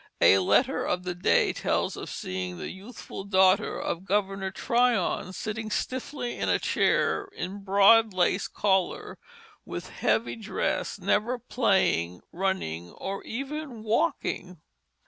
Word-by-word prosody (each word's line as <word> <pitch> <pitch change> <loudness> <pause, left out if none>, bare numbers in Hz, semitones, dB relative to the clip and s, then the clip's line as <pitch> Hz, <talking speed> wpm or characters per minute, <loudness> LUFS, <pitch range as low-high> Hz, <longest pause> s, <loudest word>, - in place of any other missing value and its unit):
A 95 - +7
letter 250 - +2
of 180 0 -1
the 180 -1 -3
day 175 +1 +2
tells - - -1
of - - -7
seeing 90 -1 -4
the - - -5
youthful 195 0 -9
daughter 190 -1 +3
of 170 +2 -3
Governor 195 -1 -1
Tryon 235 -2 +1
sitting 215 +4 -4
stiffly 255 +2 -3
in - - 0
a - - +4
chair, 410 - +1
in 190 +3 -5
broad 200 +3 +6
lace 185 +1 +1
collar, 190 -3 0 0.4
with - - -7
heavy 230 - 0
dress, 220 -2 -2
never 240 +4 +1
playing, 190 - +1
running, 165 - -2
or 195 +1 -5
even 270 -1 -5
walking. 185 -5 -1
195 Hz, 125 wpm, -27 LUFS, 185-230 Hz, 0.4 s, A